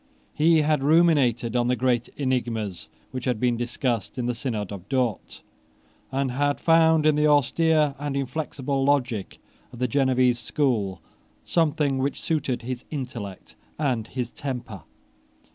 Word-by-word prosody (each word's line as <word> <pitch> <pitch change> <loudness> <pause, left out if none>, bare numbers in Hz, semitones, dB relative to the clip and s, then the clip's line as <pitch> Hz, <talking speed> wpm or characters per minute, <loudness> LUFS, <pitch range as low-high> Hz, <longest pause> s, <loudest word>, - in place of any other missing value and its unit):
He 160 +1 +4
had 150 -2 +2
ruminated 140 -7 +3
on 120 -1 +2
the 125 - +2
great 120 -1 +1
enigmas 120 -8 -2 0.2
which 130 -1 -5
had 125 -4 0
been 125 0 +2
discussed 120 -1 -2
in 125 - -2
the 125 - 0
Synod 115 -4 -3
of 100 0 -9
Dort, 125 -6 -2 0.7
and 135 -1 -1
had 145 +3 0
found 160 -1 +4
in 155 - +5
the 150 +1 +3
austere 150 +1 +3
and 145 -1 -3
inflexible 135 0 -2
logic 130 -7 0 0.3
of 125 - -11
the 125 +1 0
Genevese 130 -1 +2
school 105 - -1 0.4
something 150 -4 +1
which 135 +2 -1
suited 140 -7 -1
his 125 0 -5
intellect 120 -9 -6 0.2
and 125 -7 -1
his 125 -2 -4
temper. 125 - -6
130 Hz, 145 wpm, -25 LUFS, 120-145 Hz, 0.7 s, in